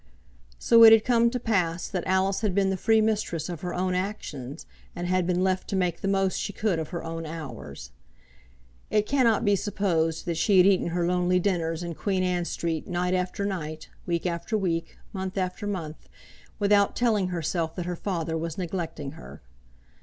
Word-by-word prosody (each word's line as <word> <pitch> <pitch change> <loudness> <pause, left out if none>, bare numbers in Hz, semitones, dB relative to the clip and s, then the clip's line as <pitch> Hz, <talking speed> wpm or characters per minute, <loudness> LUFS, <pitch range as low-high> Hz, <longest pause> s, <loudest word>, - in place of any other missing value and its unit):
So 230 - +6
it 225 - +11
had 225 -1 +6
come 235 -1 +4
to 250 +1 -3
pass 180 -7 0
that 180 -3 -4
Alice 190 +2 +1
had 205 -5 0
been 195 -1 +2
the - - 0
free 220 +4 +3
mistress 205 -7 -1
of 175 -3 -6
her 180 -1 -4
own 185 0 0
actions, 165 -8 -4 0.3
and 175 - -4
had 180 -1 +1
been 180 0 +1
left 185 0 0
to - - -2
make 180 -3 0
the - - -2
most 195 -1 +1
she - - -3
could 210 -6 0
of 160 - -4
her 170 -2 -5
own 165 0 -5
hours. 155 - -8 1.0
It 210 -1 +2
cannot 240 -4 +2
be 205 0 +4
supposed 175 -5 -1
that 170 -2 -2
she 195 +4 +3
had 180 - +7
eaten 195 -3 +3
her 175 0 -1
lonely 180 +1 +2
dinners 170 -3 -1
in 170 -1 -4
Queen 190 +2 -1
Anne 180 -1 0
Street 165 -2 -3
night 180 0 -1
after 185 +2 -1
night, 155 -5 -5 0.2
week 170 0 -1
after 175 +5 -1
week, 165 -4 -2 0.2
month 190 0 -4
after 185 +2 -2
month, 165 -6 -5 0.5
without 205 -1 +3
telling 215 -6 +2
herself 165 -1 -2
that 180 - -4
her 180 0 -3
father 165 -3 -3
was 160 0 -4
neglecting 170 -6 -4
her. 160 - -12
180 Hz, 190 wpm, -26 LUFS, 165-200 Hz, 1.0 s, it